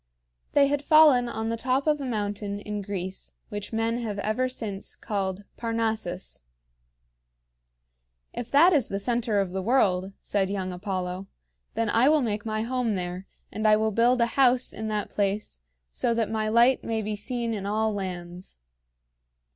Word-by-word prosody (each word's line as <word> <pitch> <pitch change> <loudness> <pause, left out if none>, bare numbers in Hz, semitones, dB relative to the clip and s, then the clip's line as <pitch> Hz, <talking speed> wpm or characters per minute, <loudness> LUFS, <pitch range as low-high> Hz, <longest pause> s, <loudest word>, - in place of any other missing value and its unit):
They 285 - +6
had 285 +1 0
fallen 290 -6 +6
on 220 0 -3
the 230 - 0
top 260 +4 0
of 300 -2 +2
a - - -3
mountain 205 -3 -3
in 210 0 -4
Greece 190 -1 -5
which 205 -2 -5
men 225 +1 0
have 215 -4 -4
ever 215 +6 0
since 210 -6 -5
called 195 -1 -3
Parnassus. 220 - -2 1.9
"If 240 0 -5
that 335 +6 +6
is 275 -7 +2
the 195 - -3
center 230 0 0
of 195 -2 -1
the 190 +1 -2
world," 190 -4 +2
said 195 -2 -1
young 190 -2 -2
Apollo, 185 0 -4 0.5
"then 230 - 0
I 240 +5 +4
will 310 -1 +4
make 215 -1 -2
my 215 0 -1
home 245 -2 -1
there, 180 +1 -4 0.2
and 215 0 0
I 215 0 +6
will 220 0 +1
build 240 +4 +3
a - - +5 0.2
house 250 -1 +4
in 220 - -5
that 210 -1 -2
place, 200 - -2 0.3
so 230 - 0
that 225 -2 0
my 215 -1 0
light 235 +3 +4
may 225 -1 -2
be 210 +1 -2
seen 230 +2 -3
in 200 -2 -4
all 215 +1 0
lands." 180 - -6
215 Hz, 170 wpm, -26 LUFS, 200-240 Hz, 1.9 s, They